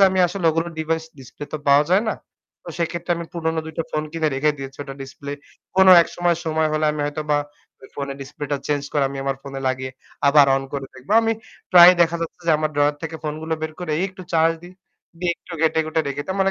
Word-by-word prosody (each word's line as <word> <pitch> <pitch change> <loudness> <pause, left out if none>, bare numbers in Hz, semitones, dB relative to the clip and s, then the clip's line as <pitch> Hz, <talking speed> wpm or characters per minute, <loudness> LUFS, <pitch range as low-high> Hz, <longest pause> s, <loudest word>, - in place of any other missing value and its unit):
যে 195 - +9
আমি 185 - -1
আসলে 185 0 -5
ওগুলো 165 +2 -1
device 160 0 -1
display 130 +3 -10
তো - - -2
পাওয়া 140 +2 +6
যায় 190 +3 +4
না। - - 0 0.5
তো - - -10
সেক্ষেত্রে 170 +1 -1
আমি 170 - -5
পুরনো 160 -1 -1
২ 160 - -7
টা - - +2
phone 155 0 -2
কিনে 160 -2 0
রেখে 150 +3 +2
দিয়েছি। 135 0 -8
ওটার 135 -1 -9
display 140 +1 -7 0.4
কোনো 190 0 +7
একসময়, 175 0 0
সময় 160 -1 +1
হলে 155 0 0
আমি 150 - -4
হয়তোবা 150 0 -1 0.5
ওই 130 - -13
phone 140 -1 -4
এর - - -10
display 145 +2 -7
টা 145 - +2
change 145 -1 -1
করে 145 -2 +2
আমি 135 0 -7
আমার 135 -1 -1
phone 135 -1 -8
লাগিয়ে 130 0 -3 0.4
আবার 145 0 +7
on 135 - -2
করে 140 -1 -4
দেখব। 130 +5 -14
আমি 225 0 +2 0.4
প্রায় 180 0 +10
দেখা 170 0 +1
যাচ্ছে 165 +1 -7
যে 165 - +4
আমার 155 0 0
drawer 145 0 +2
থেকে 165 0 -5
phone 150 -1 -3
গুলো 160 0 -1
বের 155 - -3
করে 180 -3 -5
এই - - 0
একটু 190 -1 -11
charge 165 0 +3
দিই, 175 - -12 0.5
দিয়ে 175 -1 0
একটু 180 - -14
ঘেঁটে-ঘুঁটে 160 0 +1
রেখে 140 +1 -3
দিই। - - -24
তার 190 - -2
মানে 195 - +3
155 Hz, 240 wpm, -22 LUFS, 145-170 Hz, 0.5 s, প্রায়